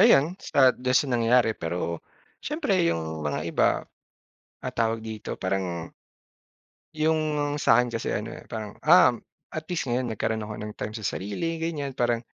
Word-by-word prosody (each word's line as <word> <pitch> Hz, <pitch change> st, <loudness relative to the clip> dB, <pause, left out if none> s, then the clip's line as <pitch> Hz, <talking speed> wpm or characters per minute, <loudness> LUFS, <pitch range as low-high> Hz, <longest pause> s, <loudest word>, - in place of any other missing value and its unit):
ayan, 150 Hz, +5 st, +6 dB
sa 130 Hz, -2 st, +4 dB
do'n 125 Hz, +1 st, 0 dB
sa 140 Hz, -, +3 dB
nangyari. 120 Hz, 0 st, +4 dB
Pero, 85 Hz, -3 st, -3 dB, 0.4 s
syempre 290 Hz, -, 0 dB
yung 80 Hz, -1 st, -2 dB
mga 75 Hz, -2 st, -2 dB
iba, -, -, +3 dB, 0.9 s
ah, -, -, -4 dB
tawag 115 Hz, -1 st, 0 dB
dito 110 Hz, -1 st, -5 dB
parang 95 Hz, -3 st, -2 dB, 1.0 s
yung 155 Hz, 0 st, +2 dB, 0.4 s
sa 125 Hz, -5 st, +5 dB
akin 125 Hz, -, -1 dB
kasi 115 Hz, -1 st, -2 dB
ano, 105 Hz, +2 st, -2 dB
eh, -, -, -12 dB
parang, 110 Hz, -3 st, -6 dB
"Um, 165 Hz, -5 st, +7 dB, 0.3 s
at 155 Hz, -, -5 dB
least 170 Hz, -6 st, -2 dB
ngayon 120 Hz, -1 st, 0 dB
nagkaroon 110 Hz, 0 st, -1 dB
ako 105 Hz, 0 st, -6 dB
ng 105 Hz, 0 st, -5 dB
time 105 Hz, -, -4 dB
sa 110 Hz, -, -7 dB
sarili." 105 Hz, -, -3 dB
ganyan. 150 Hz, -5 st, -3 dB
Parang 120 Hz, -2 st, +1 dB
115 Hz, 160 wpm, -26 LUFS, 105-140 Hz, 1.0 s, Um